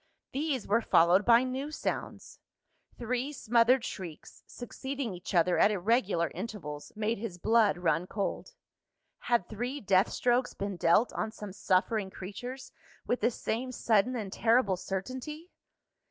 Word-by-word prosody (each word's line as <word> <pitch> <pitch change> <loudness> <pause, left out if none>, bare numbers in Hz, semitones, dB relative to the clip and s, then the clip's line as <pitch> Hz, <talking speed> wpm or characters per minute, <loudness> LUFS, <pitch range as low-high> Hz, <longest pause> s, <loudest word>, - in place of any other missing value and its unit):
These 280 -4 -2
were 230 +4 +3
followed 180 0 +4
by 235 +1 +6
new 260 +3 -3
sounds. 305 - -5 0.6
Three 250 +4 -2
smothered 245 -1 +3
shrieks, 170 -5 -8
succeeding 265 -1 -5
each 180 +1 -6
other 175 +1 +3
at - - +6
irregular 195 - +1
intervals, 170 -7 -6
made 215 0 -1
his 205 -5 -5
blood 220 0 +3
run 175 0 0
cold. 205 - -4 0.6
Had 235 -7 0
three 245 +6 -4
death 195 -3 +3
strokes 245 +1 +1
been 200 -1 -3
dealt 175 +7 +3
on 220 - -2
some 210 -3 -8
suffering 195 +1 +1
creatures, 245 +8 -8 0.3
with 245 - -1
the - - +4
same 245 +2 -3
sudden 230 0 +2
and 205 -5 -4
terrible 225 -4 +3
certainty? 255 - -6
220 Hz, 140 wpm, -30 LUFS, 190-250 Hz, 0.6 s, by